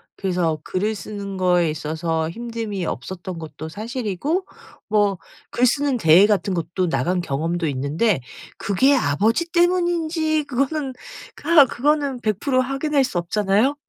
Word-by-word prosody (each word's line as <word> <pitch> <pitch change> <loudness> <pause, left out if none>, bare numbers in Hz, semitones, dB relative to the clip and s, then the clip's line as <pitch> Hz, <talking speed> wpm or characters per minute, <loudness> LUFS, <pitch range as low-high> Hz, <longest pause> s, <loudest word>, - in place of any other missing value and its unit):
그래서 175 -5 -1
글을 210 +4 -1
쓰는 200 -2 -6
거에 180 -2 +3
있어서 160 +1 -2
힘듦이 225 -2 -4
없었던 175 +7 -5
것도 160 -1 -8
사실이고 235 - -3 0.4
뭐 205 -2 +2 0.3
글쓰는 255 +2 +2
대회 175 +1 +6
같은 200 -2 +1
것도 175 +1 -1
나간 180 +2 0
경험도 165 +2 -2
있는데 145 - 0 0.4
그게 265 +9 +3
아버지 220 - +1
때문인지 340 -3 +1
그거는 275 +1 -2 0.5
아 315 -3 +7
그거는 280 0 0
100% 255 +5 +1
확인할 275 +2 0
수 250 -8 -3
없잖아요? 205 +9 +1
210 Hz, 285 characters per minute, -22 LUFS, 175-275 Hz, 0.5 s, 아